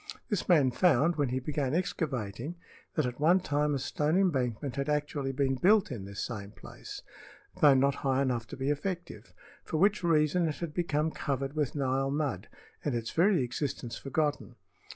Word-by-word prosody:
This 205 Hz, -4 st, -2 dB
man 145 Hz, -7 st, +5 dB
found, 165 Hz, +2 st, +3 dB
when 145 Hz, -4 st, 0 dB
he 130 Hz, -, -1 dB
began 140 Hz, +1 st, -1 dB
excavating, 140 Hz, -, -2 dB, 0.4 s
that 155 Hz, -, +1 dB
at 125 Hz, +1 st, -4 dB
one 170 Hz, +5 st, +5 dB
time 145 Hz, -3 st, 0 dB
a -, -, 0 dB
stone 150 Hz, +5 st, 0 dB
embankment 135 Hz, -, 0 dB
had 140 Hz, +1 st, -2 dB
actually 145 Hz, -2 st, -1 dB
been 135 Hz, 0 st, +1 dB
built 195 Hz, +7 st, +3 dB
in 110 Hz, -7 st, -5 dB
this 100 Hz, 0 st, -4 dB
same 100 Hz, -4 st, -6 dB
place, -, -, -10 dB, 0.5 s
although 145 Hz, -3 st, +6 dB
not 140 Hz, +1 st, +3 dB
high 135 Hz, -1 st, +2 dB
enough 120 Hz, -4 st, -1 dB
to 145 Hz, -, -8 dB
be 135 Hz, +2 st, 0 dB
effective, 150 Hz, -, -4 dB, 0.3 s
for 155 Hz, -, -3 dB
which 200 Hz, +3 st, +3 dB
reason 165 Hz, +1 st, +3 dB
it 155 Hz, -, -2 dB
had 170 Hz, -3 st, -5 dB
become 160 Hz, -2 st, 0 dB
covered 135 Hz, -1 st, -3 dB
with 150 Hz, -4 st, -1 dB
Nile 135 Hz, -1 st, 0 dB
mud 135 Hz, -9 st, -2 dB, 0.4 s
and 145 Hz, -5 st, -1 dB
its 115 Hz, -1 st, -3 dB
very 175 Hz, -3 st, +3 dB
existence 120 Hz, -1 st, -3 dB
forgotten. 145 Hz, +1 st, -2 dB
145 Hz, 175 wpm, -30 LUFS, 130-160 Hz, 0.5 s, although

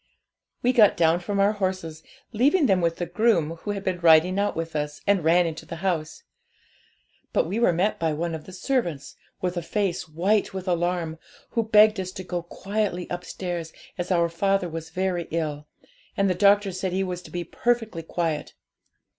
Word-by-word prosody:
'We 250 Hz, +1 st, +3 dB
got 215 Hz, -5 st, +5 dB
down 165 Hz, 0 st, +3 dB
from 200 Hz, +3 st, -3 dB
our 200 Hz, +1 st, +4 dB
horses, 185 Hz, -6 st, -3 dB, 0.3 s
leaving 285 Hz, -, +3 dB
them 190 Hz, -6 st, +3 dB
with 165 Hz, -1 st, +1 dB
the 175 Hz, -, -3 dB
groom 175 Hz, -4 st, +1 dB
who 205 Hz, -, -8 dB
had 200 Hz, -1 st, -3 dB
been 185 Hz, -2 st, -1 dB
riding 170 Hz, +3 st, +5 dB
out 205 Hz, 0 st, 0 dB
with 165 Hz, -1 st, -4 dB
us, 150 Hz, -1 st, -3 dB
and 200 Hz, -4 st, +2 dB
ran 170 Hz, +2 st, +4 dB
into 160 Hz, -1 st, -4 dB
the -, -, -7 dB
house. 160 Hz, -5 st, -2 dB, 1.1 s
But -, -, +2 dB
we 195 Hz, +7 st, -2 dB
were 235 Hz, -, +4 dB
met 185 Hz, +5 st, 0 dB
by 165 Hz, -1 st, +1 dB
one 165 Hz, +2 st, -2 dB
of 155 Hz, -1 st, -6 dB
the -, -, -11 dB
servants, 185 Hz, -, -2 dB, 0.3 s
with 180 Hz, -1 st, -2 dB
a -, -, 0 dB
face 190 Hz, -2 st, -2 dB
white 190 Hz, +6 st, +1 dB
with 190 Hz, 0 st, -5 dB
alarm, 175 Hz, -2 st, -1 dB, 0.3 s
who 230 Hz, -, +1 dB
begged 215 Hz, -1 st, +5 dB
us 185 Hz, -1 st, -4 dB
to 185 Hz, -, -7 dB
go 180 Hz, -1 st, -3 dB
quietly 195 Hz, +1 st, -3 dB
upstairs, 175 Hz, -2 st, -5 dB, 0.2 s
as 175 Hz, -1 st, -4 dB
our 170 Hz, -2 st, +3 dB
father 195 Hz, +2 st, 0 dB
was 165 Hz, -1 st, -6 dB
very 180 Hz, 0 st, -2 dB
ill, 150 Hz, -2 st, -3 dB, 0.5 s
and 200 Hz, -, +3 dB
the 185 Hz, -, +2 dB
doctor 200 Hz, +2 st, +4 dB
said 185 Hz, 0 st, -3 dB
he 190 Hz, +1 st, +1 dB
was 180 Hz, -1 st, -4 dB
to -, -, -13 dB
be 175 Hz, 0 st, -4 dB
perfectly 225 Hz, -1 st, -1 dB
quiet. 165 Hz, -2 st, -3 dB
180 Hz, 190 wpm, -25 LUFS, 165-200 Hz, 1.1 s, got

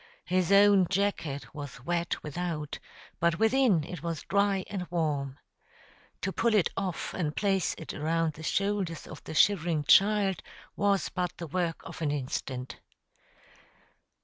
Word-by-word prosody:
His 180 Hz, +2 st, +1 dB
own 200 Hz, -2 st, +6 dB
jacket 165 Hz, -8 st, -1 dB
was 140 Hz, -4 st, -8 dB
wet 170 Hz, 0 st, -1 dB
without, 155 Hz, -1 st, -4 dB, 0.4 s
but 170 Hz, 0 st, +2 dB
within 225 Hz, -, +3 dB
it 165 Hz, +1 st, -7 dB
was 165 Hz, -2 st, -4 dB
dry 200 Hz, 0 st, +1 dB
and 185 Hz, -3 st, -4 dB
warm. 145 Hz, -5 st, -1 dB, 0.8 s
To 190 Hz, -, -1 dB
pull 230 Hz, -2 st, +2 dB
it 200 Hz, -, +3 dB
off 190 Hz, -4 st, -3 dB
and 155 Hz, -5 st, -2 dB
place 195 Hz, -3 st, +1 dB
it 160 Hz, -, -7 dB
around 160 Hz, +1 st, 0 dB
the 150 Hz, -, -11 dB
shoulders 195 Hz, -1 st, -1 dB
of -, -, -10 dB
the 160 Hz, -, -6 dB
shivering 170 Hz, -4 st, +3 dB
child 195 Hz, +2 st, +4 dB, 0.3 s
was 200 Hz, -1 st, +1 dB
but 180 Hz, -1 st, -3 dB
the 170 Hz, -, -5 dB
work 170 Hz, +1 st, -2 dB
of -, -, -9 dB
an 155 Hz, -, +1 dB
instant. 130 Hz, -2 st, -4 dB
175 Hz, 145 wpm, -29 LUFS, 155-195 Hz, 0.8 s, own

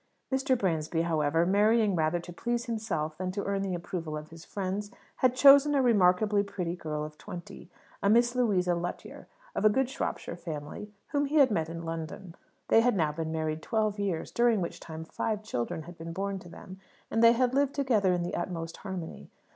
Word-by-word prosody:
Martin 265 Hz, -1 st, +2 dB
Bransby, 165 Hz, -5 st, 0 dB
however, 165 Hz, 0 st, +1 dB
marrying 210 Hz, +2 st, +3 dB
rather 160 Hz, +1 st, +1 dB
to 175 Hz, +1 st, -10 dB
please 240 Hz, +6 st, -2 dB
himself 180 Hz, -10 st, -3 dB
than 185 Hz, 0 st, -2 dB
to 200 Hz, +1 st, -3 dB
earn 200 Hz, 0 st, -1 dB
the 190 Hz, -2 st, -2 dB
approval 170 Hz, -3 st, -4 dB
of 150 Hz, +1 st, -9 dB
his 165 Hz, 0 st, -11 dB
friends, 200 Hz, +1 st, -3 dB, 0.3 s
had 255 Hz, -1 st, +3 dB
chosen 280 Hz, +2 st, +7 dB
a 275 Hz, -, +4 dB
remarkably 205 Hz, -2 st, +4 dB
pretty 195 Hz, -4 st, -3 dB
girl 155 Hz, -3 st, -4 dB
of 150 Hz, 0 st, -11 dB
twenty, 175 Hz, 0 st, -9 dB, 0.3 s
a 200 Hz, -, +2 dB
Miss 240 Hz, +2 st, +4 dB
Louisa 200 Hz, -8 st, +2 dB
Lutyer, 175 Hz, +1 st, -5 dB, 0.3 s
of -, -, -2 dB
a 215 Hz, -, +7 dB
good 265 Hz, +5 st, +1 dB
Shropshire 220 Hz, -, -4 dB
family, 160 Hz, +4 st, -7 dB, 0.2 s
whom 290 Hz, 0 st, +1 dB
he 295 Hz, -, -3 dB
had 275 Hz, -5 st, +6 dB
met 160 Hz, -5 st, 0 dB
in 165 Hz, 0 st, -6 dB
London. 165 Hz, +2 st, -6 dB, 0.4 s
They 225 Hz, -, +6 dB
had 245 Hz, -1 st, +2 dB
now 155 Hz, -3 st, +2 dB
been 160 Hz, +1 st, -4 dB
married 155 Hz, -1 st, -2 dB
twelve 215 Hz, -1 st, 0 dB
years, 190 Hz, -5 st, -2 dB
during 235 Hz, -2 st, +3 dB
which 170 Hz, -, -4 dB
time 160 Hz, 0 st, -8 dB
five 210 Hz, +6 st, -3 dB
children 140 Hz, -, -3 dB
had 175 Hz, 0 st, -12 dB
been 165 Hz, 0 st, -6 dB
born 195 Hz, +2 st, -3 dB
to 175 Hz, -, -13 dB
them, 185 Hz, +2 st, -11 dB, 0.3 s
and 225 Hz, -, +2 dB
they 230 Hz, 0 st, +8 dB
had 250 Hz, +1 st, +1 dB
lived 280 Hz, 0 st, +1 dB
together 230 Hz, -9 st, +2 dB
in 175 Hz, -1 st, 0 dB
the 175 Hz, -, -4 dB
utmost 165 Hz, -2 st, -4 dB
harmony. 190 Hz, -5 st, -7 dB
185 Hz, 200 wpm, -29 LUFS, 165-225 Hz, 0.4 s, they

